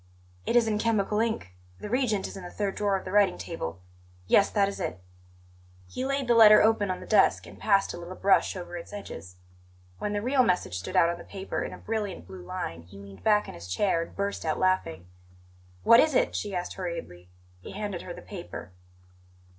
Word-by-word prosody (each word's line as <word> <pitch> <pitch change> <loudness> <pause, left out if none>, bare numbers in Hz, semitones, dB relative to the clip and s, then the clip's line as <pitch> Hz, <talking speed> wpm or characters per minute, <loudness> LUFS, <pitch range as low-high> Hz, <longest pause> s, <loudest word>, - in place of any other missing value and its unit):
"It - - +1
is 235 -2 +5
in 210 -1 0
chemical 215 -2 +1
ink; 220 - -1 0.3
the - - -6
reagent 220 -4 0
is - - -9
in 190 - -8
the 175 - -7
third 200 0 -2
drawer 200 -2 +1
of 190 - -9
the 185 - -5
writing 200 -2 +4
table. 90 - -6 0.4
Yes; 200 - +4
that 200 -2 +2
is 200 - -5
it." 90 - -3 0.9
He 255 - -5
laid 275 -1 -1
the 240 - +4
letter 215 -2 +9
open 215 -2 +3
on 185 - -3
the - - -9
desk 215 - +3
and - - -13
passed 195 -2 +2
a - - -7
little 175 +2 -8
brush 195 +1 +3
over 175 -1 -7
its 170 - -7
pages. 100 - -9 0.6
When 210 - -2
the 205 - -1
real 260 +2 +3
message 180 - 0
stood 90 - -7
out 170 - +5
on 170 0 -3
the - - -9
paper 195 -1 -5
in - - -4
a - - -8
brilliant 210 - -4
blue 95 0 -10
line, 85 -1 -5
he 90 +4 -15
leaned 100 -1 -12
back 210 -1 +3
in - - -8
his 85 +1 -10
chair 165 - +1
and 165 - -8
burst 200 0 -2
out 155 -1 -1
laughing. 185 - 0 0.8
"What 230 - +8
is 310 -3 +3
it?" - - +2
she 205 -2 -3
asked 180 0 -3
hurriedly. 165 - -6 0.3
He - - -10
handed 205 -4 -4
her 180 - -8
the - - -11
paper. 175 - -8
195 Hz, 215 wpm, -27 LUFS, 170-210 Hz, 0.9 s, letter